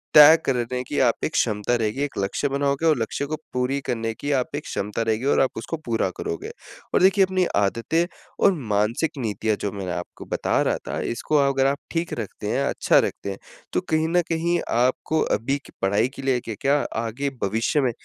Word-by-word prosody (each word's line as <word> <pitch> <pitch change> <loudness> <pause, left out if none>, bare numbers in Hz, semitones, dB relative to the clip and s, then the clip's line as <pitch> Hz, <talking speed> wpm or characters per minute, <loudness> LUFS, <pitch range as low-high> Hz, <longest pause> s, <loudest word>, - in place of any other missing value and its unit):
तय 150 +2 +10
करने 125 -1 0
की 145 - -3
आप 120 -3 +2
एक 155 - -2
क्षमता 105 +1 +1
रहेगी, 115 +3 -1
एक 145 - -4
लक्ष्य 100 +8 0
बनाओगे 140 +2 0
और 155 - +4
लक्ष्य 115 +5 -2
को 155 - -2 0.2
पूरी 125 +2 0
करने 115 -1 -1
की 145 +6 -4
आप 125 - -3
एक 150 - -3
क्षमता 105 +3 -3
रहेगी 110 +2 -1
और 140 - +3
आप 135 - +3
उसको 165 +8 -4
पूरा 115 -5 0
करोगे। 85 - -4 0.4
और - - +4
देखिए 195 +1 +5
अपनी 185 -1 +1
आदतें 115 +12 +1 0.4
और 200 - +7 0.2
मानसिक 110 +10 +1
नीतियाँ 110 -1 -1
जो 100 - -1
मैं 100 -2 -5
ना 90 - -2
आपको 90 - -10
बता - - +1
रहा - - +1
था - - -2
इसको 150 +5 0
अगर 135 -1 +2
आप 140 +1 +1
ठीक 165 0 -2
रखते 105 -1 -6
हैं, 140 - +1
अच्छा - - +3
रखते - - -2
हैं, 95 - -6 0.4
तो - - +1
कहीं 160 0 +2
न 175 +1 +3
कहीं 170 +1 +1 0.2
आपको 130 +6 +1 0.2
अभी 135 +5 -1
के - - -15
पढ़ाई 100 +5 +2
के - - -7
लिए 130 -2 +2
क 110 - -3
क्या, 140 +1 +3 0.2
आगे 115 +5 -2
भविष्य 115 +8 +1
में 130 - +1
130 Hz, 210 wpm, -24 LUFS, 110-150 Hz, 0.4 s, तय